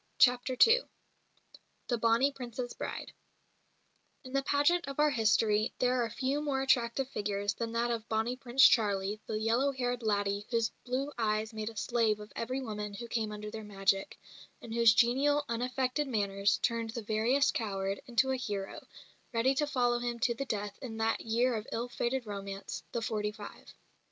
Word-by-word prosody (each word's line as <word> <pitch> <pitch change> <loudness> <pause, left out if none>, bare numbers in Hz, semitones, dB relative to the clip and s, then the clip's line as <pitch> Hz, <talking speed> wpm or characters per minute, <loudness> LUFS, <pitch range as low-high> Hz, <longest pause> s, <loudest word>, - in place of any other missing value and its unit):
CHAPTER 250 0 +4
II 465 +2 +5 1.1
THE 240 -2 0
"BONNIE 230 +5 +3
PRINCE'S" 245 -2 -6
BRIDE - - -6 1.1
In 255 - -10
the 275 - +2
pageant 290 +5 +2
of 275 - -6
our 300 0 +4
history 220 -2 +2
there 250 -1 +2
are 230 - -2
few 265 +5 -1
more 275 -3 -1
attractive 250 0 +2
figures 205 -3 -1
than 230 +1 -4
that 235 +1 +1
of 230 -1 -4
"Bonnie 225 +3 0
Prince 255 +1 +5
Charlie," 205 -2 +1
the 215 - -2
"yellow 235 +6 +2
haired 245 -2 -2
laddie" 205 -1 0
whose 230 -2 +1
blue 265 +3 -2
eyes 215 0 0
made 215 0 -3
a 225 - -12
slave 225 -2 +1
of 210 0 -11
every 255 +3 -2
woman 210 -4 -5
who 235 +3 -7
came 225 -2 -2
under 210 0 -6
their 220 0 -6
magic, 195 -1 0 0.4
and 230 - -8
whose 230 -2 +5
genial, 280 +5 +3
unaffected 255 +4 -1
manners 200 -4 +1
turned 230 -1 0
the 230 0 -5
veriest 230 +7 +2
coward 195 -3 -2
into 260 +2 +2
a 260 - 0
hero, 200 -5 -5 0.4
ready 240 +3 +2
to 295 +2 0
follow 245 -4 +1
him 240 0 -2
to 240 0 +2
the 275 +4 -4
death 205 -4 -4
in 230 -5 -6
that 225 0 0
year 240 +3 +1
of 215 -1 -4
ill 235 +2 -2
fated 240 +1 -2
romance, 200 -1 -6
"the 235 - -2
forty 210 -2 -1
five." 210 -1 -11
230 Hz, 175 wpm, -31 LUFS, 215-255 Hz, 1.1 s, II